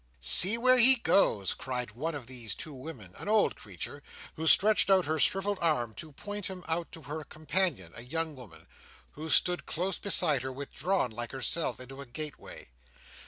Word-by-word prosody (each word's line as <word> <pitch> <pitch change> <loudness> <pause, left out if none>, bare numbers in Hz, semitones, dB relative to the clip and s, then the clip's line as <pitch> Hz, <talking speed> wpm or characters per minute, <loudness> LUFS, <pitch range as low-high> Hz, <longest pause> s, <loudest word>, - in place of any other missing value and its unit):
"See 185 - +4
where 255 +1 +4
he 260 +3 +8
goes!" 155 - +2
cried 125 -3 -4
one 150 +9 -4
of 140 -4 -7
these 120 -3 -4
two 155 - -8
women, 130 - -9
an - - -6
old 215 0 +3
creature, - - -7 0.3
who 160 0 -4
stretched 210 +5 +5
out 190 -2 +4
her 155 +1 -1
shrivelled 195 +3 +1
arm 125 -9 0
to 155 - -8
point 205 +6 -5
him 185 -2 -7
out 165 +1 -2
to 160 - -9
her 150 +2 -6
companion, 155 - -1
a 115 - -7
young 160 +5 -3
woman, 115 -11 -13 0.5
who 155 +2 -7
stood 180 +2 +3
close 180 +3 -2
beside 165 -8 +3
her, 130 +1 -4
withdrawn 140 - -2
like 120 +1 -6
herself 150 +4 0
into 135 +2 -10
a 140 - -10
gateway. 150 - -7
155 Hz, 180 wpm, -30 LUFS, 130-185 Hz, 0.5 s, he